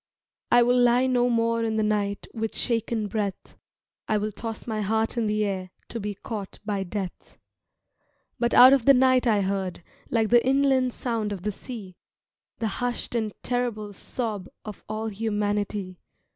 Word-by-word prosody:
"I 240 0 +6
will 245 +1 +3
lie 245 +1 +4
no 245 -1 +2
more 230 -1 +1
in 220 -1 -1
the 215 - +2
night 205 -1 -1
With 225 -1 -3
shaken 230 -2 -1
breath, 205 -1 -4 0.5
I 215 - +2
will 210 +1 -2
toss 225 +1 -6
my 220 -2 -2
heart 220 +3 0
in 230 -2 0
the 210 0 +1
air 190 -2 -3 0.2
To 230 - -4
be 205 -1 -4
caught 205 -1 -6
by 205 -2 -1
Death." 190 -1 -6 1.0
But 240 0 +1
out 255 +2 +10
of 265 -4 +2
the 275 - +7
night 255 0 +4
I 210 -3 +3
heard, 190 -3 -2 0.3
Like 225 -2 +1
the 240 -1 +6
inland 265 -1 +3
sound 225 -4 -2
of 190 -3 -5
the 210 - -1
sea, 200 -4 -9 0.6
The 225 - -1
hushed 245 0 -2
and 220 -3 -1
terrible 235 -4 -2
sob 210 -2 -4 0.2
Of 210 -2 -8
all 220 +1 -2
humanity. 205 -3 -2
220 Hz, 170 wpm, -26 LUFS, 205-240 Hz, 1.0 s, out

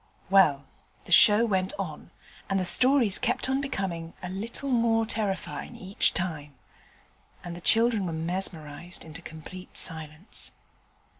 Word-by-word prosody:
Well, 150 -8 +4 0.4
the - - -12
show 210 +5 +7
went 190 -4 -1
on, 175 -6 -6 0.4
and 195 - +1
the 185 - -1
stories 250 -1 +4
kept 245 +1 -1
on 265 +1 0
becoming 185 -11 -4
a 180 - -4
little 230 +8 -3
more 230 -2 +2
terrifying 205 -4 -4
each 190 +2 +1
time, 155 -6 -3 0.9
and 175 -1 -7
the 175 - -10
children 225 -1 +3
were - - -3
mesmerized 165 -1 -4
into 160 +1 -7
complete 170 +3 -11
silence. 160 +3 -3
185 Hz, 135 wpm, -26 LUFS, 165-225 Hz, 0.9 s, show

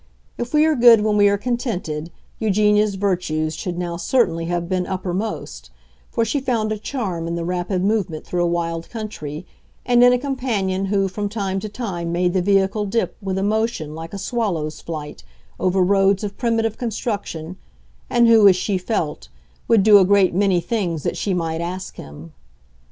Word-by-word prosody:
If 240 0 -5
we 300 0 +4
are 315 - +3
good 235 -3 +7
when 210 0 +1
we 205 -1 +5
are 200 - +1
contented, 200 - -3 0.3
Eugenia's 210 -1 +2
virtues 175 -5 -1
should 175 +2 -5
now 175 -1 -3
certainly 170 -6 +1
have 175 0 -2
been 185 -1 -1
uppermost; 185 - -4 0.4
for 230 - 0
she 255 +6 0
found 235 -5 -1
a 215 - -2
charm 195 -9 -3
in 170 - -2
the 170 -1 -3
rapid 180 +1 -2
movement 195 -7 -1
through 175 -1 -1
a - - +2
wild 165 -1 -2
country, 185 -8 -6 0.4
and 245 -1 +5
in 245 - +7
a 250 - +3
companion 235 -8 -2
who 195 0 +1
from 205 +2 -3
time 195 -3 -2
to 215 - -6
time 190 -7 -4
made 175 +1 +1
the 185 - +2
vehicle 195 +2 +2
dip, 230 +4 -1
with 190 -1 -3
a 190 - 0
motion 215 -7 -1
like 165 +1 -8
a - - -4
swallow's 190 -8 -2
flight, 150 - -7 0.4
over 185 0 +2
roads 195 +1 +3
of 205 -1 -4
primitive 225 -2 -1
construction, 200 -7 -4 0.5
and 240 -1 +4
who, 225 -3 +7
as 190 - +6
she 190 +1 -1
felt, 180 - -3 0.4
would 225 -4 +4
do 210 -1 +8
a - - +5
great 195 -1 +4
many 190 -1 +2
things 175 -4 -2
that - - -1
she 200 - -2
might 165 -1 -2
ask 185 +2 -5
him. 75 +3 -11
195 Hz, 185 wpm, -21 LUFS, 175-220 Hz, 0.5 s, do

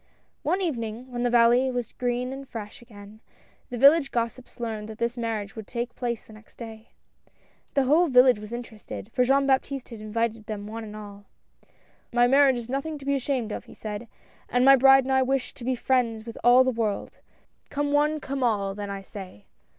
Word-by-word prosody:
One 360 +5 0
evening, 245 - -3
when 240 -1 -3
the 245 - +2
valley 240 +2 +4
was 245 -3 -3
green 250 +1 -2
and 270 0 -9
fresh 210 -1 -8
again, 210 -2 -14 0.5
the 245 - -5
village 280 +3 +6
gossips 235 +2 -4
learned 220 -2 -4
that 220 - -8
this 235 +1 -1
marriage 225 -4 -3
would 220 -2 -8
take 240 0 -4
place 235 -3 -3
the 220 - -15
next 215 0 -17
day. 225 -1 -10 0.9
The 275 - +4
whole 310 +7 +4
village 250 -4 +6
was 210 +1 -9
interested, 230 -2 -8
foi' 250 - +3
Jean 275 +2 +3
Baptiste 270 0 0
had 230 -3 -9
invited 220 0 -2
them 205 -2 -5
one 225 +2 -6
and 210 -1 -9
all. 205 -1 -10 0.4
" - - -36
My 240 0 +4
marriage 270 0 +5
is 235 -1 -6
nothing 275 +4 -3
to 275 - -12
be 280 - +1
ashamed 260 -4 -1
of," - - -5
he - - -14
said, 215 +2 -6 0.2
" - - -31
and 245 +1 +2
my 275 0 +9
bride 270 +1 +6
and 265 +1 -1
I 265 - +4
wish 260 0 -1
to - - -12
be 255 +1 0
friends 235 -3 0
with 230 - -8
all 245 +2 +7
the 260 - +1
world 225 -4 -3 0.2
— - - -41
come 290 0 -1
one, 300 +1 +2
come 275 -1 -4
all, 205 -5 +1
then, 205 0 -6
I 195 0 -5
say." 185 - -10
240 Hz, 210 wpm, -26 LUFS, 220-265 Hz, 0.9 s, my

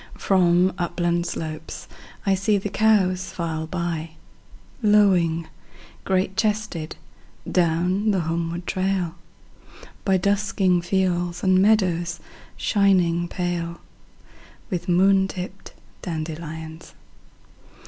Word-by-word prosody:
1From 180 -1 +3
upland 175 0 0
slopes 155 -1 -6 0.4
I 195 - +3
see 200 +2 +2
the 200 +1 -3
cows 190 -4 +2
file 160 -2 -3
by,2Lowing, 170 +2 0 0.6
great 190 0 0
chested, 210 -7 -1 0.5
down 180 +4 +1
the 195 -3 +2
homeward 170 +1 -3
trail,3By 185 +1 -3
dusking 195 -2 +1
fields 175 -1 0
and 185 -1 +4
meadows 175 -5 +2 0.4
shining 180 -4 +2
pale4With 175 +2 -7
moon 190 +2 +4
tipped 190 +1 -8 0.3
dandelions. 160 -1 -6
180 Hz, 80 wpm, -23 LUFS, 170-195 Hz, 0.6 s, and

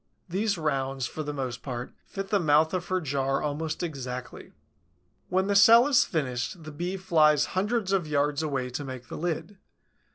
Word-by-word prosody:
These 195 +3 0
rounds, 135 -4 -1
for 155 - -5
the 150 -1 -3
most 130 -4 -4
part, 125 -2 -5 0.2
fit 195 0 -5
the 205 - +2
mouth 155 0 +3
of 180 -1 -2
her 185 0 +1
jar 135 -3 -1
almost 155 +3 -3
exactly. 130 -6 -6 0.8
When 185 +1 +2
the 200 - +1
cell 230 +4 +8
is 275 -4 +4
finished, 140 +1 -3
the 155 - -8
Bee 175 +5 -3
flies 155 -5 +4
hundreds 205 +1 0
of 190 -5 +1
yards 145 0 +1
away 135 -5 -2
to 130 +4 -4
make 130 -3 -8
the - - -6
lid. 175 +4 -3
155 Hz, 175 wpm, -27 LUFS, 135-185 Hz, 0.8 s, cell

